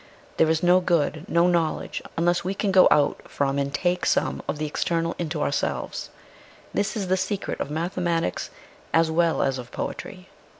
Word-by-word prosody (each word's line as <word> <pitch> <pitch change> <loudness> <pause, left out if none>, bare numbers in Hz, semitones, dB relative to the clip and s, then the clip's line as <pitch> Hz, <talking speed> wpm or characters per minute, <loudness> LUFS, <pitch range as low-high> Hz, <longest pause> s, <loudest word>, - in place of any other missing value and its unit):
There 160 - +4
is 160 +1 +1
no 180 +1 +6
good, 170 -2 0
uo 170 +1 +4
knowledge, 170 -3 0 0.2
unless 175 +1 +2
we 190 +2 -2
can 200 0 0
go 190 -1 +7
out 145 -1 +3
from 140 0 0
and 140 0 -1
take 180 +3 0
some - - +1
of - - -2
the 155 - -2
external 165 +2 -1
into 160 -2 -2
our - - +1
selves. 140 - -2 0.6
This 205 +3 -1
is 195 -3 -2
the 185 +1 +2
secret 190 +2 -3
of - - -3
mathematics 170 - -1 0.5
as 165 0 +4
well 165 0 +2
as 135 -1 0
of 125 0 -9
poetry." - - -6
170 Hz, 180 wpm, -25 LUFS, 155-180 Hz, 0.6 s, go